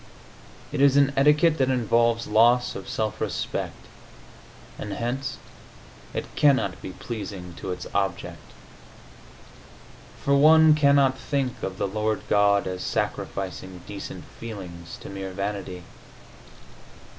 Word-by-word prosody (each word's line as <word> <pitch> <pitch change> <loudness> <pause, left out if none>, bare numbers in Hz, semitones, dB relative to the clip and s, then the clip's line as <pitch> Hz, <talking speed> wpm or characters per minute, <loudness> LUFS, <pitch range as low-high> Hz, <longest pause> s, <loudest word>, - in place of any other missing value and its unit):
It 145 -1 -1
is 140 0 +5
an 140 0 +4
etiquette 150 +3 +4
that 130 -1 +3
involves 115 -2 +2
loss 120 +3 +4
of 95 - -7
self 110 -2 -2
respect, - - -3 0.9
and 105 - -5
hence 130 +3 -3 0.7
it - - -3
cannot 135 -11 +3
be 95 - -7
pleasing 100 -6 -7
to 95 - -5
its 90 - -5
object, 95 -3 -2 1.8
for 140 - +1
one 155 +2 +7
cannot 140 -3 +4
think 135 -4 -2
of 95 0 -4
the - - 0
Lord 110 +2 -1
God 100 0 +4
as 90 0 -4
sacrificing 95 -2 -3
decent 100 -1 -7
feelings 90 -7 -9
to - - -9
mere 95 -1 -6
vanity. 100 -2 -4
110 Hz, 120 wpm, -25 LUFS, 95-135 Hz, 1.8 s, one